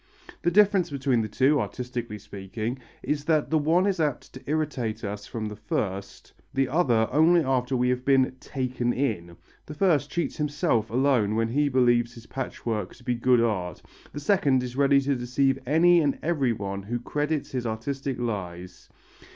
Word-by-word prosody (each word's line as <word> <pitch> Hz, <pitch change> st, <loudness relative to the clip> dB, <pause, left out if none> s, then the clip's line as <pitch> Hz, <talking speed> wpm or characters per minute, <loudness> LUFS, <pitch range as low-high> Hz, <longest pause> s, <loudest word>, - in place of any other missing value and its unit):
The -, -, +2 dB
difference 195 Hz, -1 st, +4 dB
between 135 Hz, -4 st, +1 dB
the 110 Hz, -, -2 dB
two, 135 Hz, +6 st, +2 dB
artistically 120 Hz, +1 st, -5 dB
speaking, 105 Hz, +4 st, -6 dB, 0.2 s
is 145 Hz, -1 st, -2 dB
that 155 Hz, -2 st, +1 dB
the 160 Hz, -, +3 dB
one 165 Hz, +5 st, +3 dB
is 195 Hz, -3 st, 0 dB
apt 150 Hz, -5 st, -2 dB
to 130 Hz, -, -10 dB
irritate 135 Hz, -8 st, -2 dB
us 105 Hz, 0 st, -5 dB
from 110 Hz, -2 st, -4 dB
the 105 Hz, 0 st, -5 dB
first, 100 Hz, -2 st, -4 dB, 0.2 s
the 135 Hz, 0 st, +2 dB
other 125 Hz, -7 st, +2 dB
only 165 Hz, +5 st, +5 dB
after 130 Hz, -1 st, 0 dB
we 125 Hz, 0 st, +2 dB
have 125 Hz, 0 st, 0 dB
been 130 Hz, -1 st, +3 dB
"taken 125 Hz, -3 st, -2 dB
in," 85 Hz, -11 st, -2 dB, 0.3 s
the 150 Hz, -, -8 dB
first 150 Hz, -4 st, +2 dB
cheats 170 Hz, +4 st, -2 dB
himself 145 Hz, -7 st, 0 dB
alone 120 Hz, -4 st, +2 dB
when 115 Hz, 0 st, +1 dB
he 145 Hz, +4 st, +1 dB
believes 120 Hz, -2 st, +2 dB
his 115 Hz, -1 st, -12 dB
patchwork 115 Hz, -7 st, -4 dB
to 125 Hz, -, -18 dB
be 125 Hz, 0 st, 0 dB
good 120 Hz, 0 st, +3 dB
art, 95 Hz, -7 st, -2 dB, 0.3 s
the 145 Hz, -, -6 dB
second 145 Hz, -6 st, +2 dB
is 125 Hz, 0 st, -6 dB
ready 140 Hz, 0 st, +4 dB
to 140 Hz, 0 st, 0 dB
deceive 130 Hz, +2 st, +1 dB
any 170 Hz, +4 st, +5 dB
and 145 Hz, -3 st, 0 dB
everyone 115 Hz, -11 st, -1 dB
who 120 Hz, +5 st, -3 dB
credits 150 Hz, +4 st, -2 dB
his 125 Hz, -2 st, -2 dB
artistic 135 Hz, +4 st, -3 dB
lies. 90 Hz, -6 st, -5 dB
130 Hz, 175 wpm, -26 LUFS, 115-145 Hz, 0.3 s, only